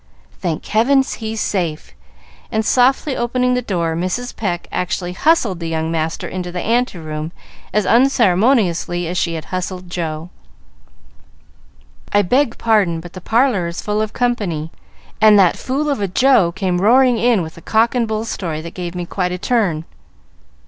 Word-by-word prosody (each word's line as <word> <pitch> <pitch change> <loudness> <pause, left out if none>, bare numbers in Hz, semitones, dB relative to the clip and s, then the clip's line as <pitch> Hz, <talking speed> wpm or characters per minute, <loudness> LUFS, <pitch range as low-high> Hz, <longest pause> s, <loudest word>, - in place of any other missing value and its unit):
"Thank 170 -4 -3
heaven, 265 +6 +3
he's 225 -3 -5
safe!" 160 - -2 0.6
and, 220 0 0
softly 260 +3 +2
opening 250 +1 0
the 250 - +1
door, 170 -8 -1
Mrs. 185 +9 -3
Pecq 175 -5 -3
actually 180 -1 -2
hustled 230 - +2
the 165 -1 -4
young 160 0 -2
master 160 0 -2
into 180 -1 -5
the 180 - -4
ante 235 0 0
room 155 0 -5 0.4
as 210 0 +1
unceremoniously 210 -7 +2
as 175 - -3
she 170 -2 0
had 160 - -6
hustled 185 0 -4
Joe. 165 -1 -4 1.8
"I 205 0 +4
beg 250 +5 +1
pardon, 205 -7 +2
but 175 +1 -11
the 185 - -9
parlor 225 -4 +2
is 170 +1 -6
full 210 0 -1
of 215 -1 -2
company, 190 -11 -1 0.5
and 215 -1 +7
that 185 -3 +5
fool 280 +4 -2
of 280 -7 -1
a 200 - 0
Joe 205 -2 +3
came 180 -1 -1
roaring 245 +3 +4
in 230 -5 +3
with 160 0 -8
a 165 - -13
cock 225 +5 +2
and 240 -2 0
bull 220 0 -2
story 170 -8 -4
that 170 +1 -8
gave 175 -1 -6
me 175 -1 -3
quite 180 0 -2
a 180 - -2
turn. 190 -6 0
190 Hz, 170 wpm, -18 LUFS, 170-235 Hz, 1.8 s, and